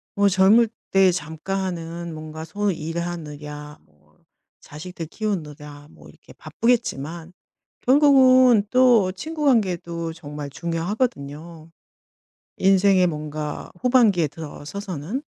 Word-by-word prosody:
뭐 200 0 +3
젊을 200 +5 +5 0.2
때 195 -1 +5
잠깐 170 +3 -4
하는 170 -2 -5
뭔가 155 0 -8
소위 200 +1 -2
일하느냐 150 -3 -6
뭐 75 0 -31 0.4
자식들 165 +2 -8
키우느냐 150 -7 -6
뭐 - - -17
이렇게 - - -18
바쁘겠지만 175 - -2 0.5
결국은 255 -5 +5
또 245 -7 +4
친구 310 - -6
관계도 170 -9 0
정말 150 -2 -8
중요하거든요, 165 - -4 0.9
인생의 190 -1 +4
뭔가 150 -1 -5
후반기에 225 - +3
들어서서는. 165 - -6
170 Hz, 250 characters per minute, -22 LUFS, 155-205 Hz, 0.9 s, 젊을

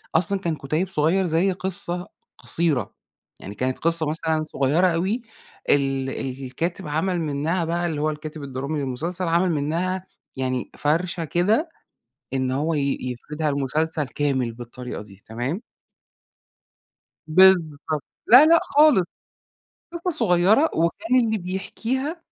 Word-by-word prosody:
أصلًا 185 +4 +2
كان 170 -4 -2
كُتيِّب 155 +6 -2
صغير 180 +3 +2
زي 175 +3 +2
قصة 180 -1 -4 0.3
قصيرة. 155 - +1 0.5
يعني 100 - -9
كانت 130 +3 -2
قصة 165 -1 +2
مثلًا 160 0 0
صغيرة 155 +4 +2
أوي 185 +8 0 0.5
ال 135 -1 +2 0.4
الكاتب 170 +8 -3
عمل 170 +4 0
منّها 160 +3 -1
بقى 170 +1 -1
اللي 155 -4 -2
هو 155 - +1
الكاتب 155 0 -6
الدرامي 140 +3 -3
للمسلسل، 165 +7 -3
عمل 170 +2 +2
منّها 170 +5 -1 0.3
يعني 130 -1 -2
فَرشة 170 +3 0
كده 210 - +1 0.6
إن 130 -1 0
هو 150 +5 0
ي 140 -2 0
يفردها 150 +5 -3
لمسلسل 150 +3 0
كامل 130 -4 -1
بالطريقة 120 0 -7
دي 100 -1 -16
تمام؟ 125 - -3 1.6
بالضبط. 155 -4 +4 0.2
لا 255 +6 +9
لأ 335 +1 +6
خالص. 290 - +5 0.9
قصة 340 +1 -2
صغيرة 205 - +3
وكان 215 +10 +2
اللي 220 -1 0
بيحكيها 240 - -3
160 Hz, 125 wpm, -23 LUFS, 140-185 Hz, 1.6 s, لا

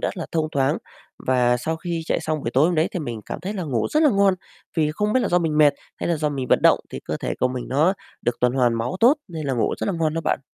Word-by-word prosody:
rất - - -2
là 170 - -4
thông 155 -1 0
thoáng 135 -1 +2 0.4
và 125 -1 +2
sau 160 +6 -2
khi 170 0 -4
chạy - - 0
xong 155 -2 -2
buổi 115 - -3
tối 135 +5 +4
hôm 175 - +1
đấy 155 +1 +2
thì 180 - -2
mình 120 -7 -5
cảm - - -5
thấy 190 +4 -4
là 195 -4 -4
ngủ 130 -8 -1
rất 305 - +3
là 295 - +6
ngon. 200 -2 +3 0.4
Vì 155 -1 +2
không 210 +5 -1
biết 255 - +3
là - - 0
do 175 - +3
mình 155 -3 0
mệt 150 -2 +6 0.2
hay - - -3
là 170 - +1
do 150 0 0
mình 135 -3 -3
vận - - +3
động - - +5
thì - - -6
cơ - - -3
thể - - -3
của 130 - +3
mình 125 -1 -5
nó 155 +8 +3 0.3
được 120 - 0
tuần 125 0 +3
hoàn 125 -3 +2
máu 115 +7 -2
tốt, 245 +5 +7
nên 160 -3 -5
là 135 - 0
ngủ 115 -3 0
rất - - -2
là 200 - 0
ngon 155 -1 0
đó 165 - -1
bạn. 150 - 0
155 Hz, 305 wpm, -23 LUFS, 130-175 Hz, 0.4 s, tốt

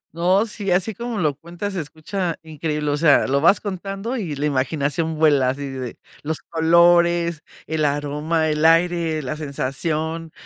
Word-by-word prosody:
No, 185 +5 +3
sí, 210 -3 -4
así 185 +4 +1
como 235 +2 -5
lo 155 -7 +1
cuentas, 175 +6 -6
se 180 - -2
escucha 165 +4 -4
increíble, 155 -1 -3
o 145 - 0
sea, 150 -2 +4
lo 140 +1 +1
vas 170 +6 +5
contando 195 +4 -4
y 175 - -3
la 145 +2 -2
imaginación 145 +4 -1
vuela, 145 -5 +4
así 140 +2 -3
de 130 -3 -6 0.2
los 155 +1 -3
colores, 170 0 +3 0.2
el 155 0 -2
aroma, 150 +3 0
el 150 0 0
aire, 165 -1 +3
la 130 +4 -3
sensación, 155 +3 -3
160 Hz, 160 wpm, -21 LUFS, 150-175 Hz, 0.2 s, vas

